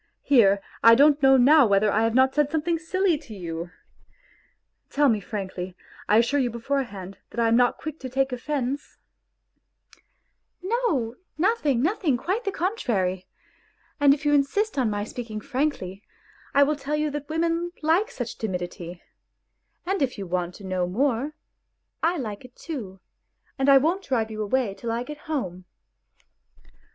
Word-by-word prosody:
Here, 200 -8 +4 0.2
I 230 0 +9
don't 290 +3 +5
know 270 -1 +6
now 275 +1 +6
whether 200 +1 +3
I 215 - +2
have 225 0 +1
not 260 +1 +4
said 295 -1 +2
something 320 +2 0
silly 355 0 +1
to 225 -8 -11
you! 170 -2 -5 1.2
Tell 290 0 +3
me 220 -3 +2
frankly; 190 -3 -6 0.3
I 210 - +5
assure 240 +5 +3
you 250 -3 +1
beforehand 230 -6 -4
that - - -6
I 230 - +3
am 225 - +3
not 245 0 +3
quick 310 0 -7
to 260 - -6
take 270 +1 0
offence?.. 270 +2 -3 0.5
." - - -31 0.2
" - - -45
No, 350 - 0 0.2
nothing, 310 - +1
nothing, 325 - +1
quite 390 - -2
the 395 - 0
contrary. 200 - -1 0.7
And 285 -1 +6
if 290 +1 0
you 295 - +3
insist 350 +10 +1
on 245 -4 +2
my 205 -1 -2
speaking 220 0 -6
frankly, 255 -8 -2 0.5
I 280 - +7
will 300 +2 +1
tell 285 +1 -3
you 300 0 0
that 290 0 -6
women 335 +2 0
like 335 +8 +2
such 245 -3 -6
timidity; 175 -3 -5 0.8
and 385 -1 -1
if 260 -4 0
you 200 - -5
want 180 0 -2
to - - -13
know 185 -2 -1
more, 260 +7 0 0.7
I 345 +2 +1
like 220 -5 -5
it 250 0 -15
too, 215 - -7 0.6
and 270 0 +1
I 275 - +9
won't 340 +8 +1
drive 225 -4 -1
you 215 0 -4
away 215 0 0
till 230 +3 -5
I 235 +1 -1
get 300 +3 -8
home." 185 - -3
260 Hz, 165 wpm, -25 LUFS, 210-300 Hz, 1.2 s, I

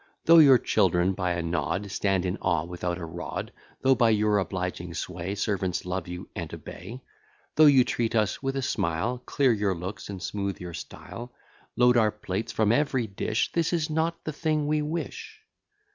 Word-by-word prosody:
Though 165 0 +8
your 140 -5 +8
children 95 -5 +2
by 90 -2 -1
a 85 -1 -2
nod 85 +4 -2
Stand 95 -3 0
in 90 +1 -1
awe 85 -4 0
without 90 0 -3
a 85 - -5
rod; 85 +2 -5 0.3
Though, 135 0 +6
by 120 -3 +3
your 105 -1 +3
obliging 90 -2 -4
sway, 90 +3 -4
Servants 95 -3 -1
love 90 -1 -3
you, 90 0 -7
and - - -5
obey; 115 +8 -9 0.5
Though 155 0 +7
you 135 -3 +7
treat 115 -1 -1
us 105 -2 +1
with 135 0 -2
a 135 - -1
smile; 110 +2 -1
Clear 135 -4 +3
your 100 -3 0
looks, 90 +5 -6
and 100 -2 -5
smooth 100 0 -3
your 90 -1 -7
style; 120 +8 -8 0.4
Load 125 0 +5
our 110 -2 +4
plates 105 0 -4
from 110 -1 +2
every 130 -1 +1
dish; 100 -2 -1
This 170 0 0
is 160 -2 0
not 165 +2 -1
the 155 - -4
thing 155 0 0
we 150 +1 +1
wish. 160 +3 -5
105 Hz, 185 wpm, -27 LUFS, 90-130 Hz, 0.5 s, Though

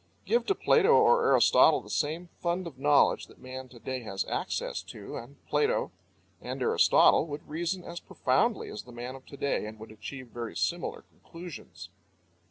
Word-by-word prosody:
Give 475 - +2
to 395 - +2
Plato - - +3
or 475 -1 +5
Aristotle - - +6
the - - -11
same 165 +4 -1
fund 175 +1 -1
of 145 -6 -9
knowledge 145 +1 +3
that - - -18
man 130 0 -8
to 125 - -14
day 130 +2 -4
has 95 -4 -3
access - - -3
to, - - -9
and 135 +4 -9
Plato 450 +2 +1 0.5
and - - -5
Aristotle 455 - +5
would 145 -1 -7
reason 175 +3 -2
as 170 - -7
profoundly 140 - 0
as 105 - -6
the 125 - -14
man 120 +2 -6
of 135 0 -13
to 140 - -11
day 140 -6 -1
and 110 +1 -9
would 110 0 -10
achieve 120 +4 -8
very 115 -6 -6
similar 90 -1 -2
conclusions. 115 - -11
135 Hz, 175 wpm, -29 LUFS, 120-170 Hz, 0.5 s, Aristotle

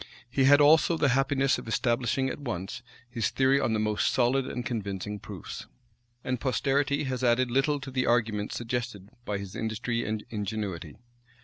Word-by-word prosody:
He 135 +1 +3
had 145 +2 +7
also 160 +3 +5
the 145 - +3
happiness 135 +1 +2
of - - -10
establishing 120 +3 +1
at 130 - -4
once 120 -3 -5 0.3
his 115 -4 -1
theory 135 +1 +3
on 115 - 0
the 110 - +1
most 105 -1 +1
solid 130 +1 +2
and 125 - -4
convincing 105 -3 -4
proofs; - - -8 0.6
and 130 -2 -2
posterity 140 +3 +1
has 130 -2 -3
added 120 0 +3
little 135 +3 +2
to 135 -1 -8
the 130 -1 0
arguments 110 -3 +1
suggested 120 -4 -4 0.2
by 105 - -2
his 100 -2 -8
industry 115 +1 -2
and 110 -1 -3
ingenuity. 100 -6 -4
120 Hz, 170 wpm, -28 LUFS, 105-135 Hz, 0.6 s, had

